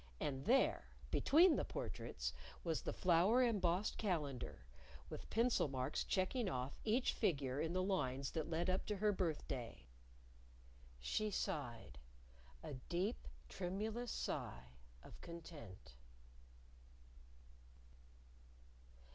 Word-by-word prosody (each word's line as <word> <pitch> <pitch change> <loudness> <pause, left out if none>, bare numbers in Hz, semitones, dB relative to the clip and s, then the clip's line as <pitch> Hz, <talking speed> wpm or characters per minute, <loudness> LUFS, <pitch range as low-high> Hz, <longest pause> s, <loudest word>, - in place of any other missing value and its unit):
And 135 -1 -2
there - - +3 0.2
between 330 +4 +6
the - - +1
portraits - - -4 0.3
was 165 -3 0
the - - -2
flower 185 +8 +4
embossed 200 -4 +1
calendar, 150 - -2 0.5
with - - -7
pencil 230 -5 +3
marks 130 +1 -1
checking 195 +4 +1
off 130 -2 -3
each 230 +4 +2
figure 140 - +1
in 165 +1 -1
the 185 0 +1
lines 140 -9 0
that 160 -1 -2
led 165 +1 0
up 185 +1 0
to 210 - 0
her 210 +1 +3
birthday. 145 - -2 1.1
She 215 - 0
sighed 120 - -3 0.6
a - - -5
deep, 175 - -2 0.2
tremulous 215 - -3
sigh 60 0 -3 0.3
of - - -12
content. 160 - -9
170 Hz, 105 wpm, -40 LUFS, 135-210 Hz, 1.1 s, between